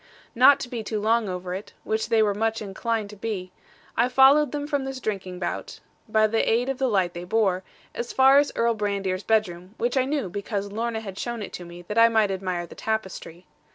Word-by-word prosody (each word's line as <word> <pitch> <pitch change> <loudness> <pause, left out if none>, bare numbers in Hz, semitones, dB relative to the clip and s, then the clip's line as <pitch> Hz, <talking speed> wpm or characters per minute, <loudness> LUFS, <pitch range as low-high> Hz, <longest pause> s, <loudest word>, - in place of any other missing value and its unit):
Not 265 +3 +6
to - - -4
be 240 -2 -4
too 215 0 -3
long 220 0 +1
over 180 0 -4
it 195 +3 -7
which 220 0 -1
they 225 -1 +4
were 205 -1 +2
much 225 +2 -1
inclined 215 +1 -3
to - - -10
be 195 -3 -4 0.4
I 250 - +2
followed 275 +3 +5
them 290 -1 -3
from 285 -2 -1
this 270 -1 -5
drinking 190 -6 -4
bout, 180 - -4 0.3
by 215 0 +4
the 225 +1 +1
aid 240 +3 +1
of 270 - -3
the 265 - +2
light 190 -6 +1
they 175 - -6
bore, 190 -1 +1 0.3
as 235 - -4
far 265 +1 +6
as 290 - +1
Earl 235 0 +2
Brandir's 200 -3 -2
bedroom, 195 -3 -1
which 245 +3 -1
I 260 - +3
knew, 280 -5 -1
because 200 +1 -4
Lorna 225 +1 -2
had 195 -3 -8
shown 235 -3 -3
it - - -8
to 175 - -7
me 175 +1 -11
that 210 +5 -1
I 230 0 +7
might 220 -3 +2
admire 185 -2 -3
the - - -12
tapestry. 190 -5 -4
220 Hz, 225 wpm, -25 LUFS, 190-235 Hz, 0.4 s, I